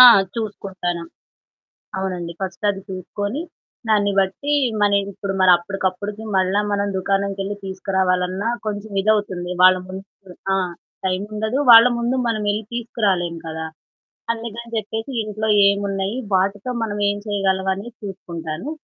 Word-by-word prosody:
ఆ! - - +14 0.3
చూసుకుంటను. 190 -6 -3 1.0
అవునండి. 180 -3 -3
ఫస్ట్ 190 +1 -5
అది 195 -1 -5
చూసుకొని, 205 - -4 0.5
దాన్ని 205 -2 +3
బట్టి 195 +10 +1 0.3
మని 200 -1 +4
ఇప్పుడు 195 +1 -4
మరప్పటికప్పటికి 190 +3 +2
మళ్ళా 190 +2 +3
మనం 200 0 +1
దుకాణంకెళ్ళి 195 +1 -1
తీసుకురావాలన్నా 190 +1 0 0.2
కొంచెం 205 0 -4
ఇదవుతుంది. 205 -4 +1
వాళ్ళ 185 0 +8
ముందు 190 +1 -6 0.5
ఆ! - - +3 0.5
టైముండదు. 210 +6 -1
వాళ్ళ 230 +1 +11
ముందు 240 +2 0
మనం 215 -2 0
ఎల్లి 210 +2 -1
తీసుకురాలేం 195 -7 0
కదా! 160 0 -4 0.7
అందుకని 230 0 -6
చెప్పేసి 220 +3 -3
ఇంట్లో 215 +1 -3 0.2
ఏమున్నాయి 200 +1 0 0.2
వాటితో 195 +5 +1
మనం 205 -2 -3
ఏం 205 - -1
చేయగలంవని 195 0 0
చూసుకుంటాను. 170 - -6
200 Hz, 115 wpm, -21 LUFS, 185-215 Hz, 1.0 s, ఆ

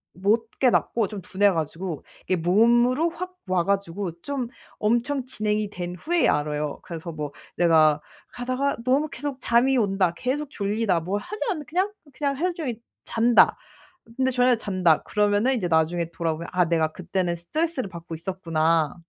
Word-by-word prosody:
못 220 +5 +1
깨닫고 235 -4 +2
좀 205 -3 -6
둔해 200 +2 +3
가지고 165 0 -3 0.2
이게 185 - 0
몸으로 240 - +3
확 365 +2 -6 0.2
와 180 -2 +2
가지고 195 -2 -1
좀 275 -4 -3 0.3
엄청 240 +5 +1
진행이 215 -3 -1
된 180 -2 -5
후에야 340 - +2
알아요. 150 0 -3
그래서 170 0 -6
뭐 150 -2 -5 0.2
내가 155 -3 +5 0.3
가다가 255 +3 -1
너무 285 +4 +2
계속 285 -3 -5
잠이 245 +3 +3
온다 195 -5 +2
계속 280 +3 -2
졸리다 200 -4 0
뭘 190 +5 -2
하지 425 - -5
않았는데 315 - -2
그냥 370 +6 +1 0.2
그냥 280 -1 -1
하루 360 +3 0
종일 250 -9 -4 0.2
잔다 235 +1 +4 0.6
근데 260 0 +2
저녁에 250 0 +4
잔다 185 -7 +2
그러면은 210 +5 +2
이제 185 -7 -1
나중에 165 +1 +1
돌아보면 165 -1 -3
'아 180 0 +4
내가 160 -1 +1
그때는 180 -1 -2
스트레스를 265 - -2
받고 170 -1 -8
있었구나.' 165 -3 0
205 Hz, 345 characters per minute, -25 LUFS, 170-255 Hz, 0.6 s, 내가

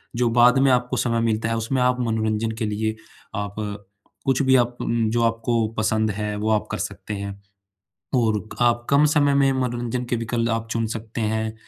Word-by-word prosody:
जो 120 0 +2
बाद 120 +2 +5
में 135 0 +4
आपको 125 0 +1
समय 115 -1 +1
मिलता 115 0 0
है, 115 - 0
उसमें 120 +4 -1
आप 125 0 +2
मनोरंजन 110 -1 0
के 115 - 0
लिए 110 +1 -1 0.4
आप, 100 0 -4 0.7
कुछ 135 0 +2
भी 130 0 +4
आप 120 0 0
म 115 -2 0
जो 120 0 +1
आपको 115 0 +1
पसंद 110 0 +1
है, 105 +1 -3
वो 110 +1 -1
आप 105 -1 +1
कर - - -2
सकते 105 - -5
हैं। 100 0 -4 0.8
और 110 -4 +1
आप 120 0 +2
कम 140 +2 +5
समय 145 -1 +3
में 135 -1 +4
मनोरंजन 125 -1 -2
के - - +1
विकल्प 115 0 -1
आप 115 0 -2
चुन 115 -1 0
सकते 115 +1 -5
हैं, 110 0 -1
115 Hz, 195 wpm, -23 LUFS, 110-125 Hz, 0.8 s, बाद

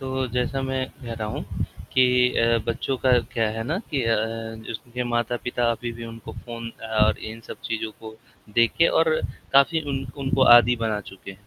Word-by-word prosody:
तो 130 -1 -2
जैसा 125 +2 0
मैं 130 0 -1 0.2
कह 120 - -5
रहा 110 -1 -4
हूँ, - - -4 0.5
कि 125 -1 +5
अ, 115 0 +3
बच्चों 125 +3 -1
का 125 -1 +6
क्या 115 -2 +1
है 115 - -2
ना 155 +8 -1
कि 140 -4 0
अ, 115 0 +3 0.5
जिसके 125 +2 -5
माता-पिता 120 0 0
अभी 120 +1 -5
भी 115 - -6
उनको 115 -1 -9
फ़ोन 115 -1 -7 0.3
और 105 0 +4
इन 115 - -9
सब - - -8
चीज़ों 110 -1 -2
को 110 0 -10 0.4
देके 115 +8 +4
और 160 -1 +4 0.4
काफ़ी 140 +4 +5
उन 135 -1 -3
उनको 135 -1 +1
आदि 120 +1 +5
बना 110 -2 -1
चुके 95 0 -11
हैं, 100 +2 -16
120 Hz, 185 wpm, -24 LUFS, 115-130 Hz, 0.5 s, का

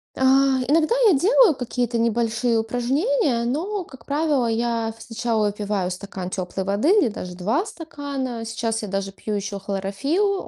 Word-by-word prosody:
А, - - -7 0.5
иногда 320 - +3
я - - +5
делаю 410 - +5
какие-то 245 -2 -2
небольшие 230 0 +1
упражнения, 250 - +1
но, 360 - -2
как 265 -7 -15
правило, 290 -4 +1
я 230 -1 -1
сначала 225 -2 -1
выпиваю 205 -3 -2
стакан 185 0 -6
теплой 185 0 -3
воды 200 - +1
или 400 - +5
даже 180 -3 -7
2 225 - 0
стакана. 285 - -5
Сейчас 225 0 -2
я 210 - -5
даже 195 0 -3
пью 210 +2 -5
ещё 200 0 -3
хлорофилл, 205 - -1
235 Hz, 150 wpm, -23 LUFS, 205-290 Hz, 0.5 s, я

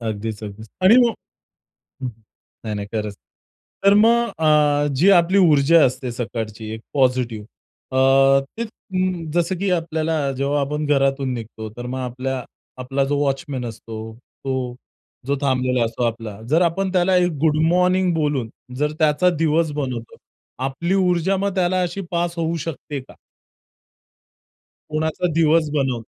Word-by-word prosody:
अगदीच, 110 -1 -4
अगदीच. 105 +1 -9 0.2
आणि 205 +6 +7
मग 230 - -1 0.9
नाही, 110 -2 -8
नाही 100 0 -5
खरंच. 105 -2 -3 0.7
तर 200 0 +6
मग 235 +2 +4
अ, 150 -2 +3
जी 175 +9 +4
आपली 180 +1 +4
ऊर्जा 160 -3 +5
असते, 125 0 -2
सकाळची 110 -2 -5
एक 110 - -7
पॉझिटिव्ह 125 -5 +1 0.5
अ, 135 +1 +5 0.2
ती 235 - -1 0.7
जसं 175 +2 +1
की 200 0 0
आपल्याला 160 -4 0
जेव्हा 140 +2 0
आपण 150 +2 -2
घरातून 135 -2 +1
निघतो, 110 -2 -7
तर 120 - -6
मग 130 +1 -4
आपल्या 130 +1 -3 0.4
आपला 135 +2 -1
जो 145 +1 0
वॉचमन 135 -2 -2
असतो. 110 -1 -8 0.3
तो 130 -2 -2 0.5
जो 140 - +1
थांबलेला 130 -3 +1
असतो 115 +2 -3
आपला. 115 -3 -3
जर 160 +4 +3
आपण 190 +3 -1
त्याला 185 0 +3
एक 180 -1 +3
गुड 155 -1 +3
मॉर्निंग 180 +2 +3
बोलून, 145 -7 -1 0.3
जर 150 +2 0
त्याचा 155 +3 +3
दिवस 160 -1 +1
बनवतो, 130 -6 -4 0.5
आपली 135 +7 -1
ऊर्जा 185 0 +2
मग 200 0 -1
त्याला 185 0 +1
अशी 180 +2 -2
पास 170 0 -1
होऊ 165 0 -1
शकते 145 -2 -5
का? 130 - -14 1.8
कुणाचा 160 +3 -1
दिवस 160 -1 +3
बनवू. 135 -5 0
145 Hz, 140 wpm, -21 LUFS, 125-170 Hz, 1.8 s, आणि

